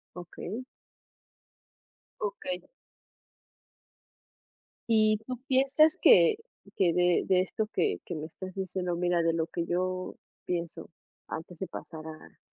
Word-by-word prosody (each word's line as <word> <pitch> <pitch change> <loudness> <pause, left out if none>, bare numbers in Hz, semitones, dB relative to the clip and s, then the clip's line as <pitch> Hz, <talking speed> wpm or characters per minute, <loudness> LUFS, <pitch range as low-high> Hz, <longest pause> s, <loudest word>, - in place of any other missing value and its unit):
Okey. 180 +7 -6 1.6
Okey. 200 -3 -3 2.3
¿Y 215 -1 +5
tú 255 0 -5
piensas 275 +4 +4
que 445 - +7 0.4
que 175 -3 +3
de 180 0 +3
de 185 -1 +4
esto 215 +3 -2
que - - +1
que 175 - -4
me 155 0 -4
estás 185 +4 -8
diciendo? 185 -2 -2
Mira, 175 0 +1
de 165 0 +2
lo 165 -1 0
que 170 0 -3
yo 185 +1 -2 0.3
pienso, 170 -2 -3 0.4
antes 165 +1 -7
de 190 - -3
pasar 160 -1 -8
a 160 0 -11
180 Hz, 120 wpm, -29 LUFS, 170-205 Hz, 2.3 s, que